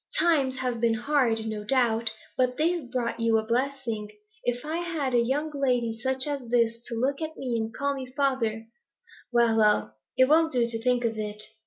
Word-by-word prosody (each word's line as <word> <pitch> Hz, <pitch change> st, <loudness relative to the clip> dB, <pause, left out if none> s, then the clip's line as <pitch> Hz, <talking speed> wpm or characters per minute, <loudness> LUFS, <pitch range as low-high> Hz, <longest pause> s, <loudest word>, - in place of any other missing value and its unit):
Times 285 Hz, -7 st, +3 dB
have 250 Hz, -3 st, -2 dB
been 230 Hz, -1 st, +3 dB
hard, 240 Hz, -3 st, +1 dB
no 215 Hz, -1 st, -4 dB
doubt, 230 Hz, -1 st, +2 dB, 0.2 s
but 250 Hz, -1 st, +1 dB
they've 325 Hz, -4 st, 0 dB
brought 235 Hz, -2 st, -2 dB
you 230 Hz, -1 st, +3 dB
a 220 Hz, -, -1 dB
blessing. 235 Hz, -3 st, -2 dB, 0.3 s
If 245 Hz, +2 st, -2 dB
I 315 Hz, +2 st, -2 dB
had 320 Hz, -7 st, -2 dB
a 240 Hz, -, +4 dB
young 290 Hz, +6 st, -1 dB
lady 250 Hz, -5 st, +1 dB
such 260 Hz, +2 st, +2 dB
as 280 Hz, -5 st, -4 dB
this 230 Hz, -1 st, +2 dB
to 235 Hz, -, -5 dB
look 275 Hz, +4 st, 0 dB
at 315 Hz, 0 st, -4 dB
me 250 Hz, -3 st, -2 dB
and 220 Hz, -1 st, -2 dB
call 280 Hz, +5 st, -1 dB
me 265 Hz, -2 st, -6 dB
father 235 Hz, -6 st, 0 dB, 0.7 s
well, 235 Hz, -2 st, +3 dB
well, 210 Hz, -1 st, +3 dB, 0.2 s
it 260 Hz, -, +6 dB
won't 320 Hz, +1 st, +4 dB
do 245 Hz, -2 st, +3 dB
to 230 Hz, -1 st, -4 dB
think 245 Hz, 0 st, +1 dB
of 225 Hz, -1 st, -1 dB
it.' 210 Hz, 0 st, -4 dB
245 Hz, 195 wpm, -27 LUFS, 230-275 Hz, 0.7 s, it